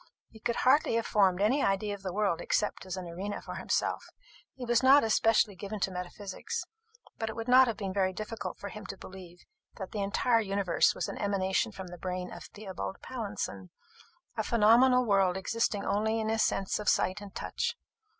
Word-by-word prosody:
He 220 - -15
could 235 +2 -1
hardly 265 -2 +3
have 230 - 0
formed 190 -3 +3
any 250 +8 +3
idea 200 +1 0
of 200 - -8
the 190 -1 -4
world 195 -3 0
except 210 -2 -1
as 185 0 -4
an 185 - -5
arena 185 +5 -5
for - - -8
himself. - - -1 0.5
He 255 - -6
was 240 0 +3
not 270 +2 +7
especially 220 -2 +3
given 205 +2 -6
to 190 - +1
metaphysics; 190 - -5 0.6
but 225 - -2
it 220 - -6
would 225 +1 -5
not 255 +1 +7
have 225 -3 -2
been 195 -2 -4
very 190 -1 +1
difficult 215 +4 -6
for 200 - -7
him 210 0 -9
to 195 - -7
believe 180 -2 -12 0.3
that 190 - -6
the 210 - -3
entire 225 +4 +2
universe 195 -4 +2
was - - -2
an - - -6
emanation 200 +2 0
from 190 -2 -8
the 175 0 -10
brain 180 0 -4
of - - -9
Theobald 195 -2 -6
Pallinson 200 - -5 0.7
a - - 0
phenomenal 240 +3 +5
world 195 -3 +3
existing 205 +1 -1
only 220 +3 +1
in 220 0 -1
his 220 0 +1
sense 195 -2 0
of 210 - +1
sight 185 +3 +1
and 200 -1 -11
touch. - - -2
205 Hz, 200 wpm, -30 LUFS, 190-225 Hz, 0.7 s, not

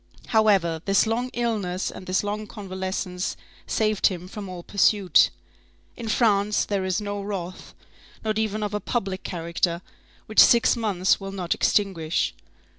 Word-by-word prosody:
However, 195 -8 +3
this 195 +2 +3
long 235 +3 -1
illness 210 -6 -2
and 185 - -10
this 185 +2 +1
long 210 +1 -3
convalescence 190 -2 -4 0.3
saved 215 -3 +2
him 180 -2 -4
from 200 0 -7
all 180 -1 -7
pursuit. 200 -1 +4 0.7
In 235 - -7
France, 210 -2 +2
there 200 -2 -1
is 185 -2 0
no 205 -1 -4
wrath, 190 -3 -6 0.5
not 215 0 0
even 215 -1 -1
of 210 0 -3
a 210 - 0
public 195 -3 -2
character, 170 0 -2 0.4
which 215 - +1
six 235 +1 +6
months 200 -6 +1
will 195 -1 -6
not 185 -3 -1
extinguish. 175 -6 +1
200 Hz, 145 wpm, -25 LUFS, 185-215 Hz, 0.7 s, six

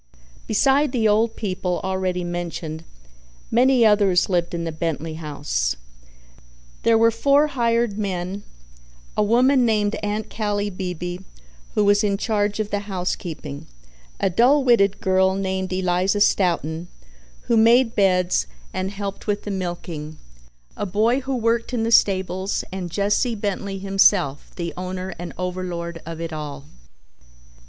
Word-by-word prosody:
Besides 270 +5 +3
the 225 -3 +2
old 220 +2 +2
people, 185 -3 -2
already 185 -1 -1
mentioned, 165 -2 -5 0.7
many 250 0 +4
others 200 -4 +4
lived 175 -2 0
in 170 - -3
the 165 - -3
Bentley 160 0 -3
house. 145 - -2 1.1
There 230 -1 +4
were 230 +1 +5
four 280 +6 +3
hired 235 -5 0
men, 190 -1 -3 0.7
a - - +2
woman 250 +5 +4
named 215 -3 +2
Aunt 210 +1 -2
Callie 205 -1 -1
Beebe, 180 -1 -4 0.6
who 210 - +3
was 205 +1 +4
in 200 -1 +1
charge 210 -1 0
of 210 -1 -2
the 205 0 -3
housekeeping, 170 -6 -4 0.5
a - - +2
dull 260 +9 +4
witted 205 -6 +3
girl 190 0 +3
named 190 -1 -2
Eliza 185 +2 +1
Stoughton, 175 -5 +1 0.5
who 235 - 0
made 230 +2 +5
beds 180 - +2 0.3
and 185 +1 -2
helped 200 0 -6
with 205 -1 -1
the 205 - -4
milking, 175 -5 -5 0.6
a 205 - -3
boy 220 +7 +2
who 265 0 -3
worked 230 +1 0
in 225 - 0
the 230 - 0
stables, 190 -2 +2
and 185 -2 -4
Jesse 205 +6 +1
Bentley 200 -1 -3
himself, 195 -6 +2
the 170 -2 -4
owner 185 +1 -5
and 175 0 -6
overlord 175 -2 -4
of 165 -1 -6
it 165 -1 -5
all. 145 -2 -6
195 Hz, 140 wpm, -22 LUFS, 175-220 Hz, 1.1 s, were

